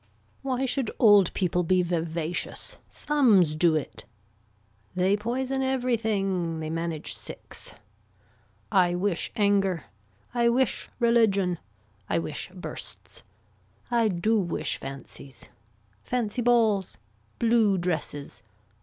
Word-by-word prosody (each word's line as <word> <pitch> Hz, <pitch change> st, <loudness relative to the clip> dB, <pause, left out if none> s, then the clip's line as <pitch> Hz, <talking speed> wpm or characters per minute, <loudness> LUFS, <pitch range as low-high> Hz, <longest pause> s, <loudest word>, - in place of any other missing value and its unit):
Why 265 Hz, -1 st, -1 dB
should 260 Hz, -2 st, 0 dB
old 205 Hz, -5 st, +6 dB
people 180 Hz, -1 st, +1 dB
be 180 Hz, +1 st, +2 dB
vivacious. 170 Hz, -, -2 dB
Thumbs 220 Hz, -, +3 dB
do 160 Hz, 0 st, +3 dB
it. 155 Hz, -, -4 dB, 0.9 s
They 185 Hz, +2 st, +3 dB
poison 255 Hz, +5 st, -2 dB
everything. 215 Hz, -10 st, 0 dB
They 155 Hz, 0 st, -4 dB
manage 165 Hz, -1 st, -3 dB
six. -, -, -6 dB, 1.0 s
I 180 Hz, -3 st, +3 dB
wish 180 Hz, -1 st, -1 dB
anger. 200 Hz, -5 st, +2 dB, 0.5 s
I 235 Hz, -1 st, +3 dB
wish 255 Hz, +2 st, +1 dB
religion. 215 Hz, -7 st, +3 dB, 0.5 s
I -, -, +2 dB
wish 165 Hz, 0 st, -3 dB
bursts. 180 Hz, -1 st, -8 dB, 0.7 s
I 235 Hz, -2 st, +3 dB
do 215 Hz, +4 st, +1 dB
wish 175 Hz, -4 st, -1 dB
fancies. 135 Hz, -1 st, -9 dB, 0.5 s
Fancy 245 Hz, -1 st, -1 dB
balls. 225 Hz, -5 st, +2 dB, 0.4 s
Blue 225 Hz, -4 st, +3 dB
dresses. 165 Hz, -5 st, -3 dB
195 Hz, 100 wpm, -27 LUFS, 175-235 Hz, 1.0 s, old